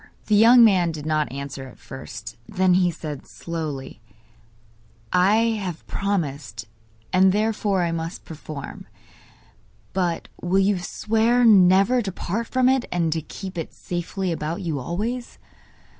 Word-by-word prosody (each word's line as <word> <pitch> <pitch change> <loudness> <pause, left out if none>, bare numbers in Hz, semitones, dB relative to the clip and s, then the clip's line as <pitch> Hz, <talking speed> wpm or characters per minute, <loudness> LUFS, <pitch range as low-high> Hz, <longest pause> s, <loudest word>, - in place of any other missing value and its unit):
The 215 - +2
young 235 +3 +8
man 185 -6 +4
did 155 -2 -7
not 155 -3 0
answer 140 -1 -6
at 125 - -14
first; 120 -2 -9
then 185 -1 +2
he 180 -1 +4
said, 150 -4 -7
slowly: 150 -8 -6 1.1
'I 185 +3 +4 0.3
have 180 -4 -5
promised, 145 - -3 0.5
and 190 +1 +5
therefore 210 -2 +1
I 170 - 0
must 165 +2 -5
perform. 155 -3 -8 1.1
But 175 -3 -1
will 180 +2 +1
you 195 0 +3
swear 225 +6 +1
never 195 +3 +5
to 200 -4 -3
part 215 +6 -3
from 255 -1 +2
it, 260 -1 +2
and 170 -3 +1
to 160 - -2
keep 185 +3 -7
it 160 - -6
safely 180 +1 -3
about 165 +3 -3
you 160 -5 -2
always? 220 - -4
180 Hz, 140 wpm, -23 LUFS, 155-205 Hz, 1.1 s, young